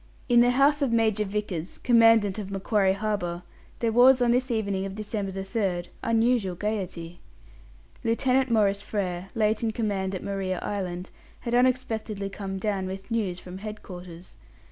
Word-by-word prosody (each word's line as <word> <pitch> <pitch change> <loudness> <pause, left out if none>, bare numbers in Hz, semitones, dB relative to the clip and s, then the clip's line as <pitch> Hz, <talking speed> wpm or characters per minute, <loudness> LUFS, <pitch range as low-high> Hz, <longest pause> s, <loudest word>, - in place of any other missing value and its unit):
In 240 -2 +5
the 240 +1 +6
house 280 +4 +3
of 275 -4 +1
Major 220 -2 +2
Vickers, 195 -4 -4
Commandant 225 -4 +4
of 200 -2 -5
Macquarie 195 0 +1
Harbour, 195 -4 -2 0.3
there 230 -1 0
was, 250 +3 +6
on 240 -1 +3
this 255 +2 +1
evening 200 -5 -1
of 195 0 -5
December 205 -2 -3
3rd, 190 -2 -2
unusual 230 -4 +1
gaiety. 180 -4 -4 0.8
Lieutenant 255 +3 +2
Maurice 200 -3 +2
Frere, 190 -3 -3
late 215 -1 +1
in 230 - 0
command 200 -4 -2
at 185 - -5
Maria 195 -2 -2
Island, 185 -2 -4 0.3
had 235 - -4
unexpectedly 230 -5 0
come 195 -1 -5
down 195 -1 -1
with 195 +4 -7
news 200 -6 -1
from 185 +1 -9
head 215 +1 -7
quarters. 175 -1 -10
205 Hz, 155 wpm, -26 LUFS, 190-230 Hz, 0.8 s, the